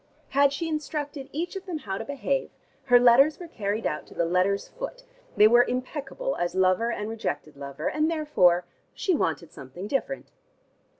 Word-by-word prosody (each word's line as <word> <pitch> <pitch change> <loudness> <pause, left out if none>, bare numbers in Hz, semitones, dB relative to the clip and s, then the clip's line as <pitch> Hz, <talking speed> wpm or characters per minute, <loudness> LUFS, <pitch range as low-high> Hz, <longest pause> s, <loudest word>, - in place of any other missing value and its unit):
Had 280 0 +4
she 305 +4 -3
instructed 300 -3 -4
each 340 +6 -3
of 385 0 -7
them 350 -3 -3
how 195 -9 -5
to - - -3
behave, 275 -1 -2 0.4
her 245 -2 +4
instructions 245 +5 +6
were 350 - -8
carried 215 -7 -3
out 150 - -2
to - - -15
the 170 - +1
letter's 185 +3 +1
foot: - - -7 0.3
they 210 - +8
were 240 +2 +6
impeccable 275 - -3
as 175 +1 -2
lover 190 +5 +3
and 210 -2 -3
rejected 220 -9 -4
lover, 140 +2 -5
and 305 +1 +1
therefore 185 - +3 0.3
she 375 - 0
wanted 165 - -1
something 135 +8 -9
different. 285 - -3
250 Hz, 175 wpm, -26 LUFS, 190-305 Hz, 0.4 s, they